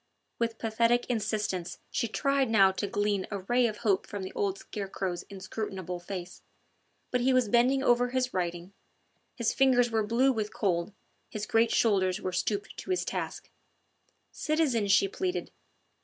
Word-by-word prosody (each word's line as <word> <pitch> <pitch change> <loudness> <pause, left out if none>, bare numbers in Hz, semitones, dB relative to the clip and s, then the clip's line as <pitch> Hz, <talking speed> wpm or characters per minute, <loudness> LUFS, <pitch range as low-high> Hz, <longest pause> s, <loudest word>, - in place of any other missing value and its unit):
With 230 -1 -1
pathetic 230 +2 +2
insistence 210 -5 -2
she 235 - 0
tried 275 +2 +1
now 195 -4 +6
to 195 +2 -3
glean 205 -1 0
a 200 -2 -4
ray 240 +5 +2
of 215 -2 -4
hope 195 -3 +2
from 205 -2 -5
the 185 - -6
old 195 -1 -1
scarecrow's 190 -4 -4
inscrutable 190 -2 -5
face. 180 0 -7 0.7
But 250 - +1
he 260 +2 +3
was 255 -3 +3
bending 250 +4 +3
over 245 -1 +3
his 255 0 -1
writing: 175 +1 -3 0.6
his 235 -3 0
fingers 245 -3 +4
were 220 -1 +2
blue 235 +6 +3
with 215 -4 -2
cold, 180 -2 0 0.4
his 215 -1 -4
great 225 +1 +3
shoulders 195 -5 +2
were 185 - -3
stooping 205 +2 -1
to - - -8
his 370 -1 0
task. - - -4 0.8
"Citizen," 300 -9 +1
she 195 0 +5
pleaded. 365 - -3
215 Hz, 155 wpm, -29 LUFS, 190-245 Hz, 0.8 s, now